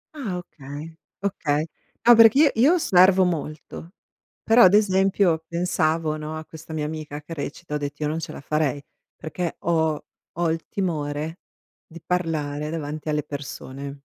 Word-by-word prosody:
Ah 215 -11 -4
okay, 155 -1 -9 0.3
okay. 155 -6 0 0.4
No, 240 - +9
perché 230 +3 +7
io 300 -1 +6
io 265 +9 +5
osservo 185 - +5
molto, 165 +1 -5 0.5
però 230 +2 +5
ad 185 +2 +7
esempio 190 -4 +3
pensavo, 165 -2 0
no, 155 +1 -5
a 155 - -7
questa 160 0 -12
mia 150 -1 -2
amica 150 -1 -5
che 165 +3 -9
recita, 150 +1 -6
ho - - +2
detto: 145 +1 -5
"Io 150 - 0
non 160 - -2
ce 165 -1 -6
la - - -8
farei," 145 -1 -1 0.3
perché 170 +2 -4
ho 160 -2 0 0.3
ho 170 -1 +1
il 165 0 -4
timore 155 -3 -3 0.5
di 170 +1 -12
parlare 155 -4 -2
davanti 155 -1 -5
alle 150 -1 0
persone. 140 -1 -7
160 Hz, 160 wpm, -24 LUFS, 150-180 Hz, 0.5 s, No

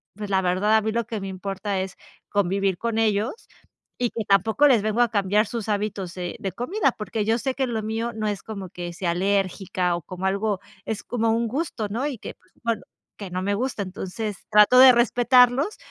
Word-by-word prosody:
pues, 210 -1 -6
la 190 - +3
verdad, 190 +4 +2
a 220 - +2
mí 220 - -1
lo 235 +1 -1
que 220 -3 -4
me 195 - -5
importa 195 +1 -3
es 190 0 -5 0.3
convivir 195 -1 +1
con 230 -1 -2
ellos, 220 - 0 0.5
y 245 -1 +1
que 225 -2 -4
tampoco 220 +8 +4
les 245 -7 +4
vengo 215 +2 +1
a 240 - +4
cambiar 205 0 +2
sus 230 -3 -5
hábitos, 200 -3 -2
eh, 180 +3 -4
de 195 -4 -3
comida, 275 - 0
porque 210 0 -3
yo 225 +2 +2
sé 265 +2 -1
que 265 -1 0
lo 225 -3 -2
mío, 225 +2 -2
no 215 - -3
es 205 -3 -2
como 200 -4 -7
que 175 0 -6
sea 170 0 -1
alérgica 185 -1 0
o 175 - -5
como 185 +1 -6
algo 200 0 0 0.3
es 220 -2 -4
como 230 -2 -1
un 230 +1 +1
gusto, 250 -4 -3
¿no?, 240 +8 -1
y 280 -4 -4
que, - - -7
pues 185 - -32
bueno, 230 -2 -1 0.4
que 200 -3 -6
no 185 +1 -2
me 200 +1 0
gusta, 245 -1 -2
entonces 195 +2 -5
trato 210 +4 +6
de 260 0 +10
respetarlos, 245 - +4
210 Hz, 215 wpm, -24 LUFS, 195-235 Hz, 0.5 s, de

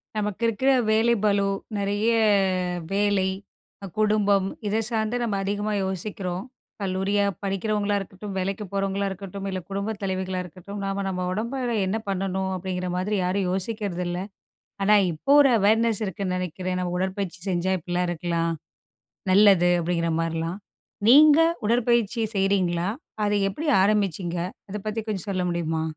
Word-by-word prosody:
நமக்கு 210 +1 -2
இருக்குற 260 +5 +2 0.2
வேலை 225 +2 +4
பளு 200 -1 +3 0.3
நெறைய 205 +2 0 0.9
வேலை, 200 -1 +2 0.7
குடும்பம், 205 -2 +3 0.2
இதை 210 +2 +1
சார்ந்து 220 +1 0
நம்ம 220 -4 -1
அதிகமா 205 +2 -1
யோசிக்கிறோம். 190 -1 -3 0.4
கல்லூரியா 195 +1 +1 0.2
படிக்கிறவங்களா 205 +1 0
இருக்கட்டும், 195 +1 -8
வேலைக்கு 195 +2 -2
போறவங்களா 195 0 0
இருக்கட்டும், 195 +1 -7
இல்ல, 190 -1 -3
குடும்ப 200 +2 -2
தலைவிகளா 190 -1 -2
இருக்கட்டும் 185 +4 -9
நாம 195 0 -2
நம்ம, 180 -1 -2
உடம்பு 225 +7 -3
அளவுல 240 -3 -1
என்ன 200 +4 0
பண்ணணும்? 190 0 -1
அப்டிங்கிற 180 0 -3
மாதிரி 200 +4 -1
யாரும் 185 +1 0
யோசிக்கிறதில்ல. 185 -3 -2 0.6
ஆனா, 210 +2 +5 0.2
இப்போ 160 - -2
ஒரு 275 - +5
அவேர்னஸ் 220 +2 +3
இருக்குன்னு 190 -1 -3
நெனைக்கிறேன். 185 +1 -3
ஏன்னா, 180 0 -1
உடற்பயிற்சி 190 -1 -3
செஞ்சா 185 +1 0
இப்படிலாம் 175 +2 -1
இருக்கலாம். 170 0 -1 0.8
நல்லது. 190 -3 +6
அப்டிங்கிற 170 0 0
மாதிரிலாம். 165 +2 -2 0.5
நீங்க 295 +4 +8 0.3
உடற்பயிற்சி 235 -1 +2
செய்யிறீங்களா? 190 -3 +1 0.4
அத 205 - +1 0.2
எப்படி 300 +11 -5 0.2
ஆரம்பிச்சீங்க? 190 -4 0 0.3
அத 205 - -4
பத்தி 215 +1 -1
கொஞ்சம் 205 -3 -3
சொல்ல 185 -2 -1
முடியுமா? 165 -2 -1
195 Hz, 130 wpm, -25 LUFS, 185-210 Hz, 0.9 s, நீங்க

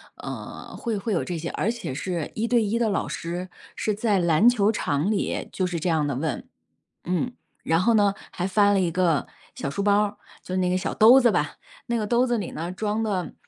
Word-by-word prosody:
呃， - - -8
会 225 -3 -2
会 215 +2 -2
有 175 - +1
这 175 - -4
些， 165 +1 -4
而 205 - -1
且 235 - -5
是 170 +2 -3
一 225 +2 -1
对 235 -1 +3
一 215 +2 0
的 230 -2 +2
老 200 - -1
师， 175 +2 -5 0.3
是 215 - -1
在 205 -1 +1
篮 170 +4 +4
球 220 -3 +3
场 150 -4 0
里 210 - -2
就 185 - -1
是 175 -2 -3
这 175 +3 -1
样 155 -3 +1
地 140 - -2
问。 145 +1 -3 0.6
嗯， 185 +8 -1 0.3
然 165 +1 +2
后 230 +5 +3
呢， 205 -2 +4 0.2
还 180 - -2
翻 205 +1 +4
了 195 - +3
一 175 -2 +1
个 170 -3 +1 0.3
小 140 - -4
书 175 +8 -2
包 205 +1 +4
儿， 210 0 -2 0.3
就 185 - -4
那 180 -1 +1
个 185 - +1
小 - - -3
兜 235 +4 +8
子 240 -2 +5
吧， 150 -4 -1 0.3
那 235 - 0
个 215 -2 -1
兜 240 +3 +3
子 240 -2 0
里 195 - -4
呢 170 +3 -4
装 210 +3 -1
的， 195 -5 -2
195 Hz, 245 characters per minute, -25 LUFS, 170-220 Hz, 0.6 s, 兜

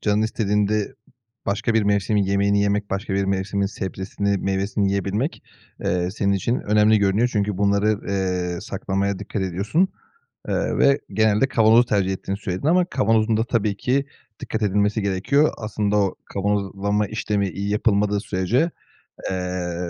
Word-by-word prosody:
canın 105 0 +1
istediğinde 105 -1 0 0.5
başka 110 +3 0
bir 110 - +3
mevsimin 100 0 +1
yemeğini 100 +1 +2
yemek, 100 0 0
başka 95 0 -2
bir 100 0 +1
mevsimin 100 +1 -1
sebzesini, 100 0 -3
meyvesini 95 +1 0
yiyebilmek, 100 - -2 0.4
eee, 90 0 0
senin 100 0 0
için 110 +6 0
önemli 105 +1 +4
görünüyor. 100 +4 +2
Çünkü 105 -2 -1
bunları, 100 +1 +2
eee, 90 -3 -1
saklamaya 100 0 -2
dikkat 100 0 -4
ediyorsun. 100 - 0 0.6
Eee, - - -1
ve 140 0 +4
genelde 110 +4 +2
kavanozu 115 -1 +5
tercih 100 -4 +1
ettiğini 95 +1 -4
söyledin 95 +5 -3
ama 180 +2 +4
kavanozun 115 -7 +1
da 115 - +2
tabii 110 -5 0
ki 135 +4 0 0.3
dikkat 110 - -4
edilmesi 105 +1 +1
gerekiyor. 100 +10 +2
Aslında 105 -1 -1
o 100 -2 +1
kavanozlama 100 +1 -1
işlemi 105 -2 -1
iyi 100 +2 -4
yapılmadığı 105 -1 +1
sürece, 110 - 0 0.6
eee, 90 -1 -3
100 Hz, 140 wpm, -22 LUFS, 95-110 Hz, 0.6 s, kavanozu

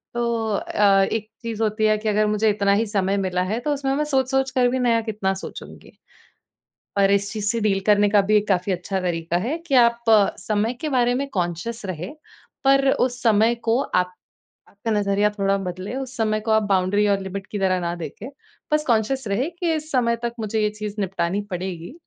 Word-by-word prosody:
तो 240 - 0 0.3
अ, 195 -1 +3
एक 220 -1 -2 0.2
चीज़ 225 -1 -4
होती 215 0 0
है 215 0 +3
कि 215 0 -2
अगर 210 +1 +2
मुझे 210 +1 +2
इतना 200 -1 +2
ही 220 +3 +2
समय 195 -1 0
मिला 185 -2 -1
है, 210 +5 -2
तो 295 +4 -1
उसमें 275 -1 -1
मैं 300 - +1
सोच-सोच 270 -2 +1
कर 250 -2 +3
भी 260 +1 -1
नया 230 -2 +2
कितना 210 -3 -2
सोचूँगी? - - -10 1.1
और 195 0 +4
इस 200 0 +1
चीज़ 210 -2 -3
से 230 - -2
डील 200 -2 +2
करने 205 0 +4
का 205 0 +5
भी 215 - +5
एक 210 0 -1
काफ़ी 190 0 +1
अच्छा 190 +2 -3
तरीका 170 -1 -1
है 315 +5 -1
कि 275 - +1
आप 235 -1 +4 0.4
समय 215 +3 -1
के 310 - -2
बारे 245 -3 +2
में 280 +2 -2
कॉन्शियस 190 +5 -3
रहें, 180 - -5 0.5
पर 275 0 +4
उस 245 0 0
समय 225 +1 +4
को 235 +3 +3
आप 180 -8 -1 0.6
आपका 210 +3 -5
नज़रिया 205 0 +2
थोड़ा 195 0 +1
बदले, 185 +4 -5
उस 265 -1 -5
समय 215 -1 +1
को 220 0 -2
आप 220 0 +4
बाउंड्री 195 +2 +2
और 200 -1 +2
लिमिट 190 0 -6
की 205 - -3
तरह 185 -1 +1
ना 170 0 -2
देखे। 170 - -7 0.4
बस 300 0 +2
कॉन्शियस 235 +2 +1
रहे 225 +10 0
कि 340 -1 -1
इस 310 0 -6
समय 235 -3 +2
तक 235 - -2
मुझे 220 0 -1
ये 210 - +2
चीज़ 210 0 -6
निपटानी 190 +1 -1
पड़ेगी। 180 -1 -5
210 Hz, 205 wpm, -22 LUFS, 195-240 Hz, 1.1 s, का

